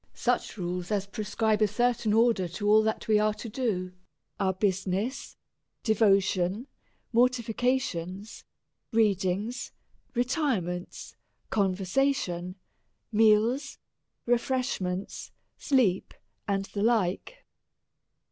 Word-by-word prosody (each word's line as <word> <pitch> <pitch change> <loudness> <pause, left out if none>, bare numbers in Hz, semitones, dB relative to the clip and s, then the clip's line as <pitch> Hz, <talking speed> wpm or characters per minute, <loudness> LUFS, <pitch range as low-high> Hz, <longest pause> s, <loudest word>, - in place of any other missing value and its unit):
Such 245 -3 -1
rules 180 -1 -3
as 200 -2 0
prescribe 215 +1 -1
a 215 - +5
certain 235 +1 +1
order 225 -4 +3
to 200 +5 -4
ail 215 +1 +7
that 220 0 -2
we 215 -1 +4
are 215 0 +1
to 235 - -7
do, 205 -6 -2 0.5
our 190 -1 +2
business, 195 +6 -2 0.5
devotion, 200 -1 +2 0.5
morti 245 +1 +3
fications, 220 -5 -2 0.5
readings, 210 +1 0 0.4
retirements, 240 - -2 0.4
conversation, 190 -1 0 0.6
meals, 225 +6 +3 0.5
refreshments, 240 -7 -1 0.3
sleep, 240 -10 +1 0.3
and 195 -1 0
the 200 - -5
like. 220 - 0
215 Hz, 90 wpm, -28 LUFS, 190-240 Hz, 0.6 s, ail